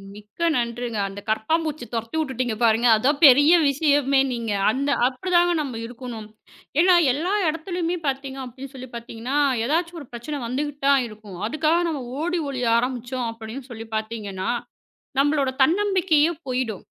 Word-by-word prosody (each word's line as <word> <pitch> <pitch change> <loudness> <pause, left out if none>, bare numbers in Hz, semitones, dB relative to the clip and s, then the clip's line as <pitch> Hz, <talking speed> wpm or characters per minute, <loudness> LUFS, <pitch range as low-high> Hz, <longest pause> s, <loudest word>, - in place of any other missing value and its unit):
மிக்க 210 +9 -14
நன்றிங்க. 235 -2 -2
அந்தக் 200 +2 -10
கரப்பாம்பூச்சிய 305 +5 -1
துரத்தி 230 +3 -4
விட்டுட்டீங்க 255 -6 -2
பாருங்க. 230 +1 +4
அதுதான் 275 +7 +1
பெரிய 290 +4 +7 0.2
விஷயமே 280 -1 +2
நீங்க. 230 -2 -3 0.2
அந்த 275 +4 -1 0.2
அப்பிடிதாங்க 350 +6 +2
நம்ம 270 -5 -5
இருக்கணும். 235 -2 -8 0.5
ஏன்னா 360 +1 +6 0.2
எல்லா 335 +8 -1
இடத்துலயுமே 335 +2 -2
பார்த்தீங்க 270 0 -3
அப்பிடின்னு 260 +2 -9
சொல்லிப் 255 -1 -10
பார்த்தீங்கன்னா, 235 +3 -4 0.3
எதாச்சும் 335 +5 -1
ஒரு 285 - -11
பிரச்சன 245 +5 -5
வந்துகிட்டுதான் 280 +2 +1
இருக்கும். 210 -4 -11
அதுக்காக 310 +6 +1
நாம 300 -5 -3 0.2
ஓடி 350 +2 -1
ஒழிய 250 -3 -2
ஆரம்பிச்சோம் 245 0 -2
அப்பிடின்னு 230 +4 -9
சொல்லிப் 225 -1 -9
பார்த்தீங்கன்னா, 215 -4 -4 0.7
நம்மளோட 285 -1 +2
தன்னம்பிக்கையே 350 -2 +3 0.2
போயிடும். 250 -5 -2
260 Hz, 135 wpm, -23 LUFS, 230-305 Hz, 0.7 s, பெரிய